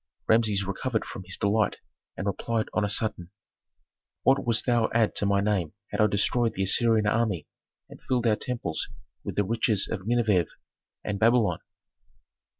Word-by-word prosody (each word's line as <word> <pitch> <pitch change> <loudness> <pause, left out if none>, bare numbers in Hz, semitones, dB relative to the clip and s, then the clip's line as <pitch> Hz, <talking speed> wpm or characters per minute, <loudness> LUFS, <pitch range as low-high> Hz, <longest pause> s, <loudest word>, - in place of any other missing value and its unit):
Rameses 110 -3 +3
recovered 110 +4 -2
from 95 - -8
his 95 - -4
delight 100 0 +1 0.4
and 95 - -4
replied 110 +3 -2
on 105 - +1
a 105 - 0
sudden, 105 -5 0 0.9
"What 135 +1 +3
wouldst 115 -1 +1
thou 120 -3 +2
add 115 -2 +3
to 100 - +2
my 100 0 +2
name 100 -6 -1 0.2
had - - 0
I 105 - +5
destroyed 115 +3 +1
the 95 - -1
Assyrian 110 +2 +4
army 105 -7 0 0.4
and - - -14
filled 125 -2 -1
our 110 -2 +4
temples 120 - -3 0.3
with - - -5
the 105 - +2
riches 110 -1 0
of 100 -2 -5
Nineveh 110 -8 +2 0.6
and 100 -1 -3
Babylon?" 115 0 +3
105 Hz, 160 wpm, -26 LUFS, 100-115 Hz, 0.9 s, I